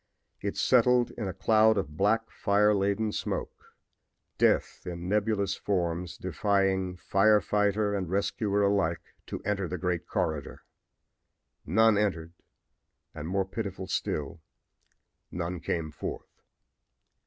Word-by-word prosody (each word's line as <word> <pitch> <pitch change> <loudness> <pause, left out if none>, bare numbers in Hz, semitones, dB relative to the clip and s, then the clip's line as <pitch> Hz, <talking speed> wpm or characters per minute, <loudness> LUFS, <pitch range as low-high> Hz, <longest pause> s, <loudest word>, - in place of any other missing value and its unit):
It 100 - -3
settled 125 -1 +4
in 110 -4 -5
a - - -2
cloud 110 +2 +4
of 75 -6 -3
black, 110 +6 +1
fire 105 +1 +3
laden 100 +2 0
smoke - - -5 0.6
death - - +2
in 85 0 -5
nebulous 105 0 +1
forms 90 -2 -2
defying 95 0 0
fire 105 +4 +4
fighter 105 0 +1
and 95 -4 -2
rescuer 100 +1 0
alike 100 -5 0
to - - -5
enter 100 -2 -1
the 90 - -4
great 90 -2 -2
corridor. 80 -8 -3 1.0
None 110 +5 +4
entered, 85 -5 -1 0.8
and, 75 - -6
more 95 +2 0
pitiful 95 -1 -5
still, 75 -3 -3 0.9
none 85 0 -4
came 80 -1 -3
forth. 75 - -7
100 Hz, 120 wpm, -28 LUFS, 90-105 Hz, 1.0 s, settled